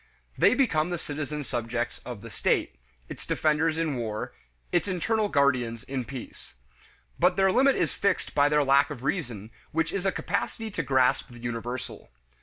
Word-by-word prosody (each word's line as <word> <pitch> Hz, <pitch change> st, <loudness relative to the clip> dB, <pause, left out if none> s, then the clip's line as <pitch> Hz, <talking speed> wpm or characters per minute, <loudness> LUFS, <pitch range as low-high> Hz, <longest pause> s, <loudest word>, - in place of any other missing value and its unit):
They -, -, +5 dB
become 180 Hz, -, +2 dB
the 175 Hz, -, -1 dB
citizen 150 Hz, -1 st, -4 dB
subjects 120 Hz, -1 st, -3 dB
of 120 Hz, -5 st, -8 dB
the 115 Hz, -, -10 dB
state; -, -, 0 dB, 0.3 s
its -, -, -8 dB
defenders 155 Hz, +1 st, +1 dB
in 160 Hz, -5 st, 0 dB
war; 110 Hz, -2 st, -4 dB, 0.4 s
its 175 Hz, -, +2 dB
internal 210 Hz, +4 st, 0 dB
guardians 125 Hz, -, +2 dB
in 130 Hz, -2 st, -4 dB
peace. 130 Hz, -, -9 dB, 0.6 s
But 180 Hz, +1 st, +4 dB
their 195 Hz, 0 st, +4 dB
limit 265 Hz, +6 st, +4 dB
is -, -, 0 dB
fixed 200 Hz, -, 0 dB
by 145 Hz, 0 st, +4 dB
their 150 Hz, 0 st, +3 dB
lack 140 Hz, +2 st, +4 dB
of 130 Hz, -4 st, -7 dB
reason, 120 Hz, -, -3 dB, 0.2 s
which 165 Hz, +1 st, 0 dB
is 195 Hz, -1 st, -1 dB
a -, -, +3 dB
capacity 225 Hz, +4 st, -3 dB
to -, -, -1 dB
grasp 130 Hz, 0 st, +2 dB
the 120 Hz, -, -12 dB
universal. 120 Hz, -, -5 dB
145 Hz, 170 wpm, -27 LUFS, 120-175 Hz, 0.6 s, They